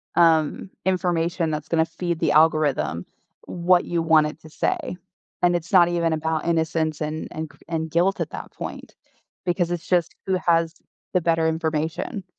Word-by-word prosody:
um, 165 +1 +3 0.2
information 175 -3 0
that's 150 0 -4
gonna 160 -1 +2
feed 170 0 -3
the - - +2
algorithm 150 - +2 0.4
what 175 +1 +2
you 170 -1 -1
want 160 -2 +4
it 150 - -8
to 155 - -13
say?" 180 - -2 0.4
And 175 0 +4
it's 170 +2 -4
not 175 -2 +7
even 170 -2 +1
about 160 0 -1
innocence 160 -1 0
and 155 +1 -3
and 155 0 -5
cr - - -20
and 160 -2 -3
guilt 180 +4 +2
at - - -2
that - - -7
point, - - -8 0.5
because 175 -1 0
it's 175 -2 -4
just, 175 -2 +1
"Who 190 -1 +1
has 165 -2 +2 0.4
the 180 - +3
better 165 -1 +2
information?" 160 +4 -2
165 Hz, 170 wpm, -23 LUFS, 160-175 Hz, 0.5 s, not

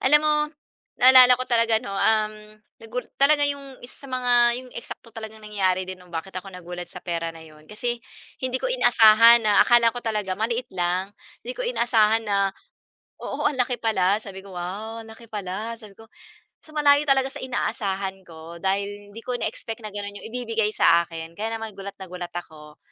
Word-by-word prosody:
Alam 295 +3 +5
mo 305 - +3 0.6
naalala 255 0 +8
ko 255 - -3
talaga 230 -2 +2
ano, 200 -2 -4
um, 215 +1 +2 0.5
nagu 225 +3 -5 0.2
talaga 290 +1 +5
'yong 280 -2 -4
isa 275 +3 -11
mga 255 -1 0 0.2
'yong 255 0 -9
eksakto 235 -1 -9
talagang 220 -1 -9
nangyayari 190 -3 0
din 185 0 -8
'no 180 - -17
bakit 170 +3 -6
ako 185 +2 -6
nagulat 180 -1 -8
sa 180 - -11
pera 170 -1 -2
na 165 -1 -10
'yon 155 -1 -17
kasi 240 +2 -3 0.4
hindi 255 0 -1
ko - - -2
inaasahan 230 - +6
na 210 -1 +5
akala 235 -1 +5
ko 245 - -6
talaga 210 -5 -2
maliit 230 +5 -1
lang. 185 +2 -1 0.3
Hindi - - -4
ko - - -9
inaasahan 225 - +2
na 200 -1 +2 0.7
oo, - - -4
ang 285 - -5
laki 250 0 +1
pala. 200 -4 +2
Sabi 195 -3 -9
ko, 190 -2 -11
"Wow 215 +6 -5
ang 220 - -13
laki 230 +1 -15
pala," 210 +2 -5
sabi 210 -2 -13
ko. 225 0 -16 0.6
So, - - -19
malayo 290 -1 +5
talaga 270 -1 +3
sa - - -8
inaasahan 195 -6 -3
ko 165 0 -11
dahil 200 +1 -2
hindi 230 - -9
ko 250 - -2
na-expect 225 0 -5
na - - -4
gano'n 205 0 -6
'yong - - -8
ibibigay 225 -3 -1
sa 170 0 +5
akin 165 -1 -8
kaya 225 +2 -2
naman 220 -2 -7
gulat 200 0 -7
na 190 - -8
gulat 180 -1 -7
ako. 150 -2 -10
215 Hz, 190 wpm, -24 LUFS, 190-240 Hz, 0.7 s, naalala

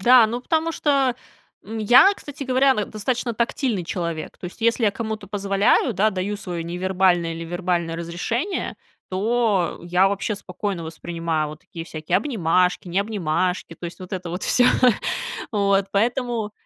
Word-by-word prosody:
Да, 245 +3 +7
ну 240 +3 -3
потому 320 +4 0
что, 275 -6 +1 0.5
м, 220 +3 -6
я, 245 - +7
кстати 290 -1 -8
говоря, 260 +1 +3
н 210 - -2
достаточно 235 +3 -2
тактильный 235 -2 -1
человек. 170 -2 -4
То - - -8
есть 180 - -9
если 230 +1 +2
я 210 - +4
кому-то 220 -2 -5
позволяю, 200 +4 +2
да, 210 +3 +3
даю 195 +1 -2
свое 175 -4 -5
невербальное 175 -1 +1
или 165 0 -6
вербальное 175 -1 -1
разрешение, 180 - -3 0.3
то 210 -1 +1
я 180 +2 +3
вообще 200 +2 -1
спокойно 195 -2 -4
воспринимаю 165 -1 -3
вот 155 0 -10
такие 170 -3 -9
всякие 160 +2 -1
обнимашки, 180 - +1
не 180 +3 0
обнимашки 185 -4 -1
то 175 - -8
есть 170 - -8
вот 185 -1 -10
это 180 -2 -4
вот 180 - -4
всё. 245 - +4 0.9
Вот. 200 -2 +2
Поэтому, 230 +1 0
195 Hz, 160 wpm, -23 LUFS, 175-230 Hz, 0.9 s, Да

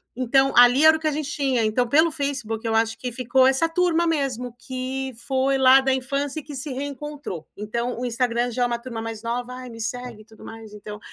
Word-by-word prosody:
Então 270 +2 +2
ali 245 +4 +7
era 315 0 +7
o - - -13
que 315 - -9
a - - +2
gente 295 -1 -3
tinha, 265 -6 0
então 235 +3 +1
pelo 315 +6 +4
Facebook 265 -6 -3
eu 225 - 0
acho 225 0 +1
que 250 -1 -5
ficou 255 +2 +2
essa 270 +5 +3
turma 340 0 +1
mesmo, 255 -6 -2
que 260 +1 -5
foi 270 0 +1
lá 265 +1 +7
da 265 0 +1
infância 275 +3 -2
e - - -11
que 290 - -9
se 275 +2 -5
reencontrou. 285 - -6
Então 235 +4 -3
o 250 - -3
Instagram 240 0 0
já 245 +1 0
é - - +3
uma 235 -1 -2
turma 235 -2 -7
mais 225 -1 -6
nova 245 +2 -3
"Ai, 255 0 -8
me 230 -1 -11
segue 240 -1 -5
e - - -29
tudo 220 -1 -17
mais, 225 -2 -10
então". 210 0 -9
255 Hz, 230 wpm, -23 LUFS, 235-275 Hz, -, ali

